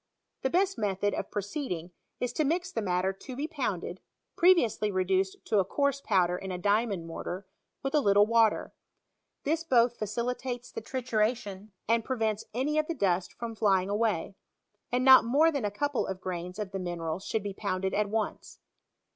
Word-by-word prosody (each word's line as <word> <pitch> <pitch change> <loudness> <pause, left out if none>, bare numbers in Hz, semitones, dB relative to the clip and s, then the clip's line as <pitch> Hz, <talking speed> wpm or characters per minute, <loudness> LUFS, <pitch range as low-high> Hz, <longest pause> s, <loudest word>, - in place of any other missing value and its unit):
The 265 - +1
best 385 +5 +1
method 205 -1 0
of - - -3
proceeding; 200 - -4 0.3
is 245 -1 -2
to 310 - +1
mix 350 +5 0
the 225 - -2
matter 185 -1 0
to 255 +6 -9
be 290 +4 -2
pounded 205 - -3 0.4
(previously 335 - +4
reduced 190 0 +1
to 210 - +2
a - - +4
coarse 280 +7 0
pow 195 -7 +3
der 175 +1 -2
in 190 0 -6
a 180 - -3
diamond 205 -1 +1
mortar) 175 +3 -5 0.4
with 270 - -2
a 300 - +5
little 205 -4 +5
water. 225 -1 +2 0.7
This 320 +3 0
both 240 -6 +3
facilitates 245 +3 -3
the - - -5
trituration, 220 -5 -2 0.2
and 230 +1 +2
prevents 220 -4 -1
any 285 +6 0
of 305 - 0
the 335 - -2
duBt 185 -5 +1
from 235 -1 -5
flying 200 -3 +2
away; 205 -3 0 0.6
and 250 +1 +1
not 265 -1 +9
more 290 +8 +4
than 280 -8 -2
a - - +1
couple 285 +6 -1
of 190 -1 -4
grains 180 0 -5
of 210 -3 -4
the 195 - -3
mineral 170 -2 -3
should 210 +2 -2
be 200 -1 -4
pounded 190 -1 -2
al 210 0 +1
once. 215 +1 -3
215 Hz, 180 wpm, -29 LUFS, 190-255 Hz, 0.7 s, not